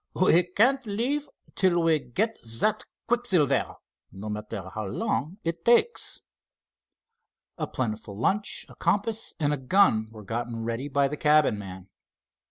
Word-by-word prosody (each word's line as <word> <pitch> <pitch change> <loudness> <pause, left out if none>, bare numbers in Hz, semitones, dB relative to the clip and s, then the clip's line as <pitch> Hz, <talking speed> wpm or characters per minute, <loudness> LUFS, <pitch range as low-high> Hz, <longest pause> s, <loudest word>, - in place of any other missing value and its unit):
"We 180 -2 +5
can't 230 +10 +2
leave 265 +8 -1 0.2
till 175 -3 +2
we 160 -2 +3
get 215 - -2 0.2
that 215 - +2 0.2
quicksilver, 230 - +2 0.4
no 100 +3 -7
matter 105 -2 -6
how 110 -2 -4
long 135 - -2
it 165 0 -3
takes." 240 - +3 1.4
A - - -2
plentiful 110 -5 -4
lunch, 200 - 0
a - - -14
compass, 220 +2 -1
and 150 -1 +1
a - - -1
gun 130 - +3
were 110 -1 -11
gotten 115 +2 -4
ready 115 +4 -3
by 140 0 +2
the 150 +2 -5
cabin 150 -8 +3
man. 95 -2 -9
150 Hz, 140 wpm, -26 LUFS, -, 1.4 s, We